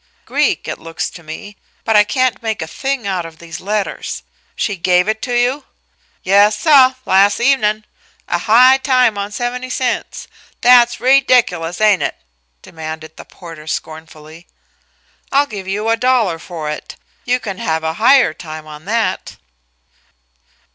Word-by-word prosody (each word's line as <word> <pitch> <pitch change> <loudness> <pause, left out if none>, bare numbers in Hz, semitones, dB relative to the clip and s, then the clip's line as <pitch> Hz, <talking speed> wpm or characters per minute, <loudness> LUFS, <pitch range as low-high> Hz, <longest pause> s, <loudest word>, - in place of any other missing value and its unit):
Greek, - - 0
it - - -5
looks 165 -1 -5
to 175 - -12
me, 165 +6 -10 0.3
but 225 - +1
I 210 - +7
can't 255 -1 0
make 220 -6 -3
a - - -7
thing 270 +3 -3
out 190 -3 -2
of 165 -1 -11
these 170 -1 -9
letters. 205 +1 -3 0.3
She 205 - -2
gave 180 +1 +2
it 220 0 -1
to 245 - -3
you?" 250 +4 0 0.6
"Yas, 205 +2 +4
suh 265 -3 +5
las' 200 +2 +3
evenin'. 215 -5 +1 0.4
A - - -1
high 250 +4 +5
time 255 -4 +2
on 200 0 -4
seventy 245 +3 -4
cents! 255 -2 -3 0.3
That's 240 -1 +6
reediculous, 245 -10 +2
ain't 210 -3 +3
it?" - - -2 0.5
demanded 160 0 -8
the - - -12
porter 165 -3 -12
scornfully. 160 +1 -8 0.8
"I'll 280 +1 +3
give 200 -7 -8
you 205 +3 -2
a 230 - +2
dollar 230 -9 +1
for 165 -3 -7
it. 150 - -8 0.3
You 250 +1 0
can 195 -5 -6
have 160 -1 -2
a 160 0 -1
higher 255 - +5
time 155 -1 -9
on 155 +1 -12
that." 225 +2 -2
210 Hz, 155 wpm, -16 LUFS, 165-245 Hz, 0.8 s, I